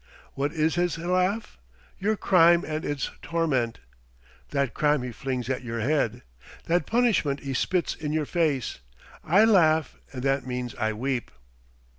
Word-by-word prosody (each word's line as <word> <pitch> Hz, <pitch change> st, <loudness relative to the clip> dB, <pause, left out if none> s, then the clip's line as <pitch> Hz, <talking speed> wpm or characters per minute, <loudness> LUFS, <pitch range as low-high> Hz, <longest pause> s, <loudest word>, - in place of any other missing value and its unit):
What 140 Hz, +2 st, -1 dB
is 160 Hz, 0 st, +1 dB
his 175 Hz, -1 st, 0 dB
laugh? 180 Hz, -, -1 dB, 0.4 s
Your 215 Hz, +2 st, 0 dB
crime 170 Hz, -2 st, +5 dB
and 155 Hz, 0 st, -3 dB
his 145 Hz, -2 st, -2 dB
torment! 135 Hz, -9 st, 0 dB, 0.7 s
That 140 Hz, -3 st, -1 dB
crime 150 Hz, -3 st, +2 dB
he 125 Hz, -, -4 dB
flings 125 Hz, 0 st, -4 dB
at 130 Hz, 0 st, -2 dB
your 115 Hz, -1 st, -4 dB
head! 120 Hz, -2 st, 0 dB, 0.4 s
That 170 Hz, -2 st, +1 dB
punishment 220 Hz, -, +2 dB
he 135 Hz, -1 st, -4 dB
spits 175 Hz, +6 st, 0 dB
in 150 Hz, -2 st, -5 dB
your 155 Hz, -1 st, 0 dB
face! 150 Hz, -, -1 dB, 0.4 s
I 195 Hz, +7 st, +5 dB
laugh, 160 Hz, -8 st, +3 dB
and 125 Hz, -2 st, -6 dB
that 135 Hz, -1 st, 0 dB
means 125 Hz, -1 st, -4 dB
I 110 Hz, -2 st, -1 dB
weep!" 125 Hz, +2 st, -2 dB
150 Hz, 150 wpm, -26 LUFS, 130-170 Hz, 0.7 s, crime